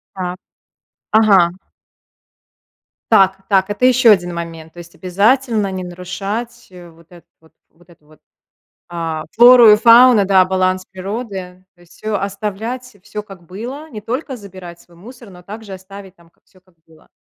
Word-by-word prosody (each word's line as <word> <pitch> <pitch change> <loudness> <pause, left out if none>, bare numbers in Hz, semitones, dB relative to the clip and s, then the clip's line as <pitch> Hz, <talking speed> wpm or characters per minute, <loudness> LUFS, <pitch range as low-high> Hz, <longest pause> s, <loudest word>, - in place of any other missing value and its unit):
Так. 180 -1 -5 0.8
Ага. 195 -5 +4 1.6
Так, 195 -2 +4
так, 195 0 +1
это 205 +5 -2
еще 250 -2 +5
один 175 -3 +2
момент. 165 -1 -8
То - - -16
есть 170 0 -12
обязательно 210 +2 0
не 185 -1 -5
нарушать, 200 +7 -6
э, 175 -2 -14
вот 165 +1 -23
эту 175 -1 -17
вот, 160 - -25 0.2
вот 175 +1 -26
эту 155 -3 -23
вот, 155 -1 -22 0.7
а, 165 -2 -4
флору 240 -1 +7
и 210 - +7
фауну, 235 -1 +6
да, 190 -2 +4
баланс 185 0 -1
природы, 190 -2 -7
то - - -28
есть, 175 - -22
всё 215 -1 -4
оставлять, 210 +5 -5
всё 210 0 -7
как 195 -4 -15
было, 250 - -8
не 215 -3 -8
только 255 +5 -5
забирать 185 -5 -12
свой 170 -1 -22
мусор, 235 +3 -14
но 180 -1 -15
также 210 -1 -10
оставить 190 0 -13
там 170 -1 -24
как - - -42
всё 185 - -26
как 185 -1 -32
было. 160 -1 -23
195 Hz, 165 wpm, -17 LUFS, 180-220 Hz, 1.6 s, флору